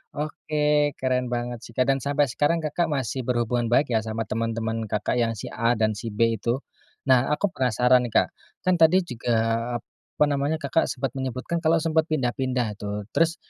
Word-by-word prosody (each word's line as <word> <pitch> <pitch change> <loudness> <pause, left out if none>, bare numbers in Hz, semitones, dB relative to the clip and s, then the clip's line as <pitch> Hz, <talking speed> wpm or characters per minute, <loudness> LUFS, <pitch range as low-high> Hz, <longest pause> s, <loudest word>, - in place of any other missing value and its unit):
Oke, 150 -1 0
keren 125 -1 0
banget 120 -1 -3
sih. 115 - -16
Kak, 130 - +3
dan 135 - 0
sampai 140 0 +1
sekarang, 160 +4 +1
Kakak 165 +3 0
masih 130 -4 -2
berhubungan 120 -1 0
baik 125 +2 +2
ya 110 - +3
sama 110 +1 -3
temen-temen 115 0 -2
Kakak, 105 +4 -1
yang 115 -1 +1
si 105 - -7
A 115 +1 +1
dan 110 0 +1
si 110 +2 -6
B 115 0 +1
itu. 120 +5 -1 0.4
Nah, 130 -1 +4
aku 170 +6 0
penasaran, 125 0 +3
Kak, 110 - +2 0.3
kan 185 -2 +2
tadi 175 +3 +5
juga 120 -5 -2 0.8
apa 150 - +4
namanya 140 +3 0
Kakak 155 +1 0
sempet 130 -1 -3
menyebutkan 130 +5 -3
kalau 165 0 +3
sempet 160 0 +1
pindah-pindah 125 -6 -1
tuh. 105 0 -4
Terus 165 +3 +2
125 Hz, 180 wpm, -25 LUFS, 115-150 Hz, 0.8 s, tadi